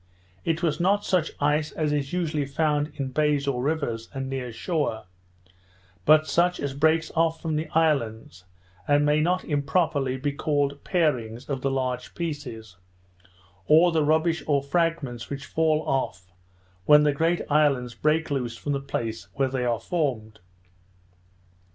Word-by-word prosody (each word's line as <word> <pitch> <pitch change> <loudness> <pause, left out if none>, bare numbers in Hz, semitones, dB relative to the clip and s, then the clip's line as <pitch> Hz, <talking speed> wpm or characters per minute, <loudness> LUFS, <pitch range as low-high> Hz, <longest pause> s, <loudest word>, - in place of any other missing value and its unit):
It 165 +2 -1
was 155 -2 0
not 200 +4 +2
such 180 -4 +1
ice 150 +1 +1
as 150 -2 -1
is 140 -2 -2
usually 155 -5 -1
found 150 +1 0
in 135 -2 -3
bays 145 0 +1
or 125 -3 0
rivers 135 -6 -2
and 135 0 -3
near 130 -2 -4
shore; 145 -1 -2 1.0
but 155 0 +6
such 175 +3 +1
as 140 -1 -3
breaks 160 +3 +2
off 165 0 +2
from 160 -2 -2
the 155 +1 -2
islands, 115 - 0 0.4
and 145 0 +3
may 150 +1 +3
not 180 +3 0
improperly 140 -2 0
be 145 +2 -1
called 145 -1 -1
parings 125 - -1
of 135 -2 -2
the 135 - 0
large 130 -2 -3
pieces, 125 - -6 0.9
or 165 +3 +6
the 160 -2 +2
rubbish 160 +2 +2
or 140 -2 +2
fragments 140 -6 -1
which 140 -1 -5
fall 155 0 +1
off 95 -9 -2 0.5
when 150 +3 +7
the 150 -1 +3
great 165 +4 +1
islands 140 -5 +2
break 155 +6 0
loose 120 -4 -2
from 145 - -4
the 140 - 0
place 115 -5 -4
where 135 -1 +1
they 130 -1 -2
are 120 -2 0
formed. 115 -7 -2
145 Hz, 155 wpm, -25 LUFS, 130-160 Hz, 1.0 s, when